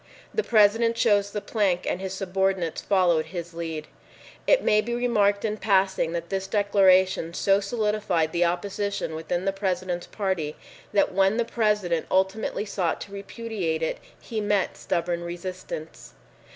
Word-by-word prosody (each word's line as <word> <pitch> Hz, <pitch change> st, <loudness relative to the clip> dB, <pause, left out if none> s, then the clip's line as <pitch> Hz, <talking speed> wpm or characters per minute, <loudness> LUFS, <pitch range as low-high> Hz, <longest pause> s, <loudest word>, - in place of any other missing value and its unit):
The 440 Hz, -, +1 dB
President 230 Hz, -, +4 dB
chose 205 Hz, -4 st, +3 dB
the 205 Hz, 0 st, -4 dB
plank 195 Hz, -6 st, 0 dB
and 180 Hz, -, -1 dB
his 190 Hz, -1 st, -4 dB
subordinates 190 Hz, -3 st, -1 dB
followed 175 Hz, -5 st, +2 dB
his 170 Hz, 0 st, -6 dB
lead. 165 Hz, -2 st, -4 dB, 0.6 s
It -, -, +4 dB
may 210 Hz, 0 st, +4 dB
be 235 Hz, +2 st, -3 dB
remarked 210 Hz, -4 st, +2 dB
in 215 Hz, 0 st, -1 dB
passing 190 Hz, -4 st, +2 dB
that 170 Hz, 0 st, -4 dB
this 195 Hz, -1 st, -2 dB
declaration 190 Hz, -4 st, +3 dB
so 195 Hz, 0 st, +3 dB
solidified 205 Hz, -6 st, 0 dB
the 175 Hz, +1 st, +2 dB
opposition 200 Hz, +1 st, -2 dB
within 170 Hz, +3 st, -3 dB
the 195 Hz, -, +1 dB
President's 185 Hz, -2 st, -2 dB
party 185 Hz, -7 st, -2 dB, 0.4 s
that 200 Hz, -, +2 dB
when 195 Hz, +3 st, +3 dB
the 235 Hz, -, +1 dB
President 210 Hz, -8 st, 0 dB
ultimately 190 Hz, +3 st, 0 dB
sought 190 Hz, -5 st, -1 dB
to 200 Hz, -, -8 dB
repudiate 200 Hz, -5 st, -3 dB
it, 160 Hz, -, -2 dB, 0.2 s
he 220 Hz, -2 st, -4 dB
met 205 Hz, -2 st, 0 dB
stubborn 170 Hz, 0 st, -2 dB
resistance. 175 Hz, -2 st, -7 dB
195 Hz, 150 wpm, -25 LUFS, 175-210 Hz, 0.6 s, President